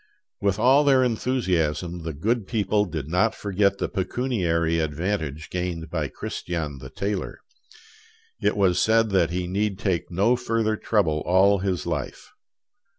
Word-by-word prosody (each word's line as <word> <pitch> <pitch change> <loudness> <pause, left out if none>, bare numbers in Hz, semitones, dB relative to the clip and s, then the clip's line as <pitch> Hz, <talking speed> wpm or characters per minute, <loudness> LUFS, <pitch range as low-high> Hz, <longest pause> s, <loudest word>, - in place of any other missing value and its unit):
With 100 -1 +1
all 130 +6 +5
their 135 -3 +4
enthusiasm, 90 - -1
the 80 0 -4
good 110 - -1
people 105 -2 +1
did 80 -6 -5
not 90 +7 +1
forget 100 0 +1
the - - -1
pecuniary 90 -6 0
advantage 80 -1 -3
gained 85 -3 -3
by 80 -4 -1
Christian 75 -2 -5
the 65 0 -9
tailor. 100 +7 -3 1.0
It - - +1
was 95 -3 +3
said 110 -1 +3
that 90 -4 +3
he 90 +1 -2
need 100 +2 -1
take 95 -5 -1
no 100 +8 +2
further 115 -3 0
trouble 90 -9 +1
all 95 +2 +4
his 95 -2 -2
life. - - -4
95 Hz, 145 wpm, -24 LUFS, 85-110 Hz, 1.0 s, all